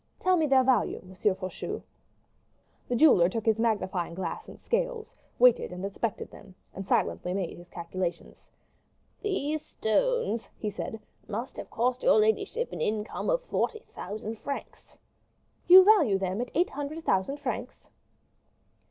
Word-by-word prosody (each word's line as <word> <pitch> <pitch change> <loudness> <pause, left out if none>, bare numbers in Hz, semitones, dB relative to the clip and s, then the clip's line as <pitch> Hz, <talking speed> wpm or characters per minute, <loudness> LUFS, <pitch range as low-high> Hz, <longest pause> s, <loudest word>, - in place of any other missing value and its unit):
Tell 370 0 +3
me 320 -3 +2
their 265 -2 +5
value, 250 -4 +2
M. 185 0 -13
Faucheux." 185 -1 -2 1.0
The 245 - -1
jeweler 235 - +6
took 225 +2 -4
his 220 -1 +2
magnifying 190 -7 -1
glass 175 -3 -5
and - - -12
scales, - - -2 0.2
weighed 245 -1 +6
and 180 +2 -5
inspected 200 +2 -3
them, 195 -3 -14 0.2
and 195 0 -7
silently 180 -2 0
made 190 -4 -3
his 175 0 -14
calculations. 170 0 -5 0.7
"These 310 -7 -1
stones," 470 - 0
he 210 - -3
said, 220 +2 -5 0.3
"must 225 +4 -5
have - - -7
cost 250 +2 0
your - - +5
ladyship 220 - +1
an - - -5
income 215 - -2
of - - +1
forty 455 -2 -2
thousand 215 +3 -6
francs." 280 -1 -7 0.7
"You 370 +1 +10
value 380 - +5
them 190 +3 -2
at 245 - -4
eight 350 +4 +2
hundred 290 +3 -5
thousand 190 +9 +1
francs?" 255 -2 -5
225 Hz, 145 wpm, -28 LUFS, 195-305 Hz, 1.0 s, You